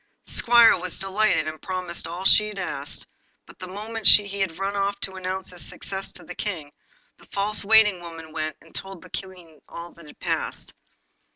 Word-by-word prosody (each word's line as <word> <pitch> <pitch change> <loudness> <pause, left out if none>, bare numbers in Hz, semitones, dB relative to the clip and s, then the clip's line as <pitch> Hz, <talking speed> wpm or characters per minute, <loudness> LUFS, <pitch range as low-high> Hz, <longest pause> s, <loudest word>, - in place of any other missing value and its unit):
The - - -5
squire 235 -1 +7
was 180 0 -3
delighted, 195 -4 +1
and 155 0 -6
promised 185 -2 -4
all 175 +3 -6
she 210 +2 +5
asked; 145 -6 -4 0.4
but - - -17
the 185 - -7
moment 215 +3 -3
he 200 -1 +6
had 190 -4 -1
run 195 +1 -2
off 200 0 0
to 190 - -1
announce 185 0 -4
his 180 - -3
success 195 0 -4
to 180 - -11
the - - -8
King, 160 -9 -4 0.5
the - - -19
false 205 +1 -1
waiting 210 -3 +5
woman 165 -2 -9
went 155 -1 -3
and 165 - -19
told 195 -2 -5
the - - -14
Queen 180 -5 -8
all 170 +1 -8
that 170 -2 -16
had - - -15
passed. - - -3
190 Hz, 190 wpm, -25 LUFS, 170-200 Hz, 0.5 s, squire